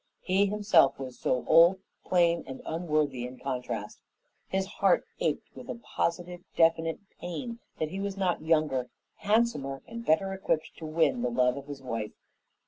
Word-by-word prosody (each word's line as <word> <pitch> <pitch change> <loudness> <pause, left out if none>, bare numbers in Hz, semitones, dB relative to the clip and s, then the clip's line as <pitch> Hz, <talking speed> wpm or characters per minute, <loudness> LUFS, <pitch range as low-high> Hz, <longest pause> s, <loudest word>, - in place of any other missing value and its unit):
He 195 +2 +3
himself 200 -8 +4
was 130 -2 -7
so 125 - 0
old, 170 +3 +7 0.3
plain, 170 -2 +3
and 130 - -7
unworthy 155 -6 0
in 125 +1 -11
contrast. 125 -6 -4 0.5
His 190 0 0
heart 210 - +2
ached - - -2
with - - -10
a - - -3
positive, 175 -5 -3
definite 165 0 +3 0.2
pain 235 +7 -5 0.2
that 155 - -2
he 190 - -4
was 200 0 -3
not 185 -3 0
younger, 155 -6 +1 0.3
handsomer, 205 -11 +1
and 230 0 -7
better 195 +2 +2
equipped 175 -5 -1
to 160 - -6
win 165 - +2
the 250 - +1
love 125 - +2
of 140 0 -8
his 140 -2 -8
wife. 115 -4 -4
165 Hz, 160 wpm, -29 LUFS, 135-195 Hz, 0.5 s, old